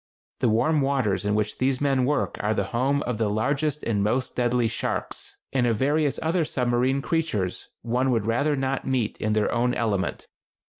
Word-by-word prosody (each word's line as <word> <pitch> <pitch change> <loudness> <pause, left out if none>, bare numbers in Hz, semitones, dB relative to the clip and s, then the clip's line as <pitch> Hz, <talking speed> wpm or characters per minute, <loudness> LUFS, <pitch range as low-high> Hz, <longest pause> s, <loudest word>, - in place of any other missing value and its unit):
The 120 - +2
warm 145 +8 +2
waters 130 -9 0
in 105 0 +1
which 105 0 -1
these 130 0 +1
men 135 -3 +2
work 145 +2 0
are 110 +1 0
the 100 - +1
home 135 +4 +1
of 120 -3 -3
the 110 -2 +1
largest 140 +8 0
and 105 -3 0
most 125 +5 -1
deadly 120 -1 +2
sharks, - - -4 0.2
and 125 -2 +2
of 115 -2 +1
various 145 +3 +1
other 165 +2 +1
submarine 130 0 0
creatures 155 - -1 0.2
one 125 +3 +1
would 115 -5 +1
rather 140 +7 +1
not 135 0 -1
meet 125 -5 0
in 110 0 +1
their 105 -1 +1
own 125 +1 +1
element. 105 -5 -1
125 Hz, 185 wpm, -25 LUFS, 110-140 Hz, 0.2 s, The